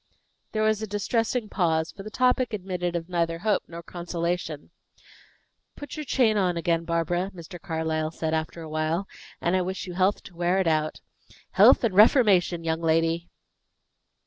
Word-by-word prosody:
There 215 0 0
was 215 0 +2
a 220 - -3
distressing 225 +3 -1
pause, 160 -5 0
for - - -11
the 210 - -7
topic 250 0 +1
admitted 180 -3 -3
of 165 -1 -3
neither 170 -2 -1
hope 210 +4 +1
nor 170 0 -9
consolation. 170 -3 -4 1.0
"Put 290 -2 -8
your 305 -1 -5
chain 235 -5 +2
on 180 -3 +1
again, 170 0 0
Barbara," 170 +2 -1
Mr. 175 +1 -10
Carlyle 160 -3 -2
said, 160 0 -3
after 160 +1 -3
a - - -8
while, 155 +5 -1 0.3
"and 175 +2 +1
I 185 - +2
wish 185 +2 -4
you 180 - -7
health 185 +3 +1
to 175 - -13
wear 175 +2 +1
it 190 - +1
out. 155 -1 0 0.5
Health - - +6
and 225 -5 +1
reformation, 195 -5 +5
young 165 0 -1
lady!" 165 +1 +1
175 Hz, 170 wpm, -26 LUFS, 165-205 Hz, 1.0 s, Health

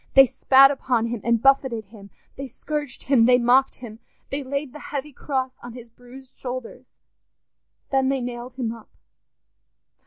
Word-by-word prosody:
They 270 0 +9
spat 270 +2 +5
upon 250 -4 -1
him 230 -2 -4
and 235 -1 +1
buffeted 265 -5 +2
him, 200 -1 -15 0.3
they 275 0 -7
scourged 295 +2 -6
him, 250 -4 +3
they 250 0 +6
mocked 250 +2 +3
him, 225 -3 -11 0.3
they 280 +1 -2
laid 280 0 -4
the 300 - -10
heavy 290 0 -6
cross 260 -1 -3
on 240 -1 -10
his 240 -1 -12
bruised 250 +2 -16
shoulders. 255 0 -7 1.0
Then 265 -1 +2
they 270 0 0
nailed 245 +1 -7
him 245 -4 -3
up. 230 -2 -14
255 Hz, 160 wpm, -23 LUFS, 240-270 Hz, 1.0 s, They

